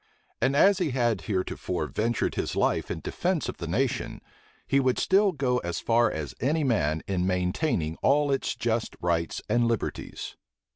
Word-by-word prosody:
And 130 Hz, +3 st, +2 dB
as 195 Hz, +6 st, +5 dB
he 175 Hz, -4 st, +1 dB
had 120 Hz, -6 st, +1 dB
heretofore 95 Hz, -4 st, -2 dB
ventured 115 Hz, +9 st, -1 dB
his -, -, -2 dB
life -, -, +1 dB
in -, -, -4 dB
defence -, -, -1 dB
of -, -, -5 dB
the -, -, -5 dB
nation, -, -, -1 dB, 0.5 s
he 140 Hz, -, +2 dB
would 130 Hz, -2 st, +2 dB
still 195 Hz, +1 st, +3 dB
go 130 Hz, -6 st, 0 dB
as 85 Hz, -5 st, -3 dB
far 115 Hz, 0 st, +3 dB
as 75 Hz, -5 st, -5 dB
any 150 Hz, +6 st, +1 dB
man 80 Hz, -, +1 dB
in 95 Hz, -2 st, 0 dB
maintaining 90 Hz, -, 0 dB
all 145 Hz, +1 st, +2 dB
its 135 Hz, -, -1 dB
just 115 Hz, -1 st, -1 dB
rights 85 Hz, -1 st, -1 dB
and 120 Hz, -1 st, +2 dB
liberties. 115 Hz, -3 st, -3 dB
115 Hz, 165 wpm, -27 LUFS, 90-135 Hz, 0.5 s, as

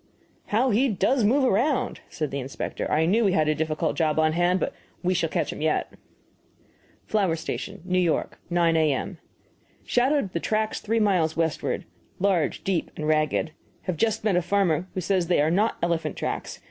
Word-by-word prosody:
"How 240 Hz, +5 st, +2 dB
he 255 Hz, +6 st, +3 dB
does 215 Hz, +5 st, +1 dB
move 260 Hz, +7 st, +3 dB
around!" 250 Hz, +3 st, +1 dB
said 155 Hz, -4 st, -3 dB
the 140 Hz, -, -2 dB
inspector 135 Hz, +1 st, -4 dB
"I 160 Hz, +2 st, +2 dB
knew 215 Hz, +7 st, +3 dB
we 195 Hz, -3 st, +3 dB
had 155 Hz, -4 st, +2 dB
a 155 Hz, -, +3 dB
difficult 155 Hz, 0 st, -1 dB
job 155 Hz, -2 st, +1 dB
on 155 Hz, 0 st, +3 dB
hand, 175 Hz, +2 st, +2 dB
but -, -, -2 dB, 0.3 s
we 180 Hz, +1 st, +2 dB
shall 170 Hz, -3 st, 0 dB
catch -, -, -1 dB
him -, -, -8 dB
yet." 155 Hz, 0 st, 0 dB, 1.1 s
FLOWER 195 Hz, -6 st, +1 dB
STATION, 165 Hz, +1 st, -5 dB
N. 180 Hz, -2 st, +2 dB
Y., -, -, 0 dB, 0.2 s
9 170 Hz, -2 st, +3 dB
A.M. 155 Hz, -4 st, 0 dB, 0.7 s
Shadowed 255 Hz, -4 st, +1 dB
the 170 Hz, -, 0 dB
tracks 215 Hz, +4 st, -1 dB
three 225 Hz, +2 st, 0 dB
miles 180 Hz, -7 st, +2 dB
westward. 165 Hz, -2 st, -1 dB, 0.3 s
Large, 185 Hz, -6 st, +1 dB
deep, 190 Hz, -4 st, -1 dB
and 150 Hz, -, -4 dB
ragged. 155 Hz, +1 st, +1 dB, 0.3 s
Have 185 Hz, -, -2 dB
just 220 Hz, +6 st, 0 dB
met 210 Hz, -4 st, +2 dB
a 180 Hz, -, +3 dB
farmer 180 Hz, -2 st, +1 dB
who 185 Hz, -, -1 dB
says 180 Hz, -1 st, +1 dB
they 175 Hz, -, +2 dB
are 150 Hz, +2 st, +3 dB
not 210 Hz, +6 st, +1 dB
elephant 170 Hz, -1 st, 0 dB
tracks. -, -, -4 dB
180 Hz, 185 wpm, -25 LUFS, 160-210 Hz, 1.1 s, he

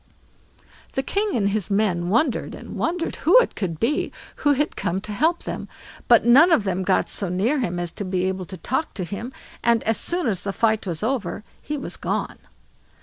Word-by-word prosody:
The 265 Hz, -, -1 dB
king 405 Hz, +5 st, 0 dB
and 200 Hz, -4 st, +2 dB
his 200 Hz, -3 st, -1 dB
men 195 Hz, -4 st, +1 dB
wondered 235 Hz, +5 st, +1 dB
and -, -, -9 dB
wondered 340 Hz, 0 st, -2 dB
who 350 Hz, +10 st, +5 dB
it -, -, +4 dB
could 170 Hz, -6 st, -3 dB
be 280 Hz, +6 st, 0 dB, 0.3 s
who 290 Hz, -1 st, +3 dB
had 290 Hz, +2 st, -1 dB
come 175 Hz, +2 st, -1 dB
to 210 Hz, -, -7 dB
help 320 Hz, +11 st, +1 dB
them, -, -, -5 dB, 0.4 s
but 235 Hz, -2 st, +6 dB
none 280 Hz, +9 st, +7 dB
of 235 Hz, -, +4 dB
them 190 Hz, -1 st, -1 dB
got 190 Hz, 0 st, +2 dB
so 195 Hz, -, -2 dB
near 215 Hz, +11 st, +1 dB
him 180 Hz, -8 st, -2 dB
as 175 Hz, -1 st, -3 dB
to 205 Hz, -, -6 dB
be 185 Hz, -1 st, -1 dB
able 190 Hz, 0 st, -2 dB
to 185 Hz, +1 st, -9 dB
talk 260 Hz, -, -2 dB
to 190 Hz, -, -3 dB
him, 200 Hz, +8 st, -5 dB, 0.3 s
and 235 Hz, -1 st, +3 dB
as 225 Hz, 0 st, +2 dB
soon 350 Hz, +1 st, 0 dB
as 200 Hz, -7 st, 0 dB
the 200 Hz, -, -2 dB
fight 220 Hz, -2 st, +1 dB
was 170 Hz, +1 st, -3 dB
over 220 Hz, -5 st, -2 dB, 0.2 s
he 300 Hz, -, -4 dB
was 270 Hz, -, -5 dB
gone. -, -, -3 dB
215 Hz, 205 wpm, -23 LUFS, 185-275 Hz, 0.4 s, none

